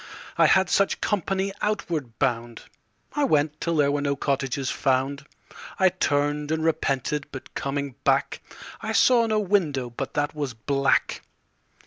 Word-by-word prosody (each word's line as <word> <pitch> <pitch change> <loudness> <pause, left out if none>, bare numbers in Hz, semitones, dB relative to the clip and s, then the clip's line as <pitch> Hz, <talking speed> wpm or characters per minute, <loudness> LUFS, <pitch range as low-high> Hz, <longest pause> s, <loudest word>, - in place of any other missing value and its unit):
I - - +5
had 190 -1 +4
such 195 +2 +2
company 195 0 -1
outward 160 - -2
bound. 120 -3 -1 0.5
I 295 - 0
went 150 - +1
till 170 -1 0
there 145 -2 +3
were 145 0 0
no 140 0 0
cottages 135 -1 -1
found. 140 +2 0 0.5
I 190 -1 +5
turned 145 -4 0
and 160 0 0
repented, 145 -2 0
but 135 - -9
coming 140 0 -3
back 135 0 +1 0.4
I - - -3
saw 235 -3 +5
no 215 -1 +1
window 160 - 0
but 135 +3 -6
that 145 0 0
was 145 -6 -4
black. 135 +4 +1
145 Hz, 145 wpm, -25 LUFS, 135-175 Hz, 0.5 s, I